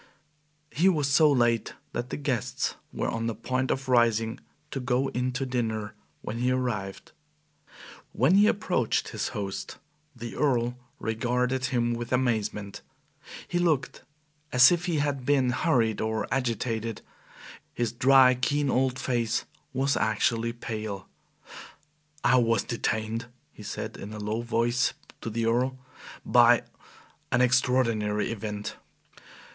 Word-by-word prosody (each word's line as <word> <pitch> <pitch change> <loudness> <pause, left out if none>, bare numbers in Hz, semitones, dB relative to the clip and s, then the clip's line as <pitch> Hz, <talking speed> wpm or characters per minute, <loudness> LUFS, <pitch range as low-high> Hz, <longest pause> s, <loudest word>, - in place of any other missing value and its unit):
He 175 +6 +3
was 150 -6 +1
so 150 +2 +5
late 120 -4 +1 0.2
that 120 +1 -3
the - - -4
guests 135 -6 -1 0.2
were - - -2
on 115 0 -2
the 115 - -2
point 130 +4 -2
of 135 0 -1
rising 115 -2 +2 0.3
to 135 - -3
go 125 +1 0
in 125 +1 -1
to 135 +1 -2
dinner 110 -4 -2 0.3
when 115 +2 -4
he 125 +1 +1
arrived. 120 -7 -2 1.0
When 175 - +3
he 205 +2 +6
approached 180 - 0
his - - -3
host, 100 -2 -5 0.4
the 120 -1 -7
Earl 120 -4 +1 0.2
regarded 125 +3 -1
him 120 -2 0
with 120 0 -5
amazement. 110 -5 -1 0.7
He 175 - -1
looked 160 -6 0 0.5
as 125 +3 +7
if 175 0 0
he 170 -3 0
had 145 -2 -1
been 130 -2 +2
hurried 120 - +1
or 110 0 -1
agitated; 115 -3 -2 0.7
his 120 -2 -1
dry, 130 +1 +6
keen 140 +2 0
old 130 0 +1
face 120 -4 -1 0.3
was 135 +1 +1
actually 115 +2 +1
pale. 110 -4 -5 1.2
"I 130 - +5
was 115 -3 +2
detained," 115 0 -2 0.2
he - - -14
said, - - -5
in 105 +2 -8
a 105 - -6
low 105 +2 -2
voice 120 +1 +1 0.3
to - - -4
the 115 +1 -1
Earl, 125 +3 +1 0.5
"by - - +5 0.7
an 125 - +3
extraordinary 115 -5 +2
event." 105 -1 -5
120 Hz, 135 wpm, -27 LUFS, 115-130 Hz, 1.2 s, as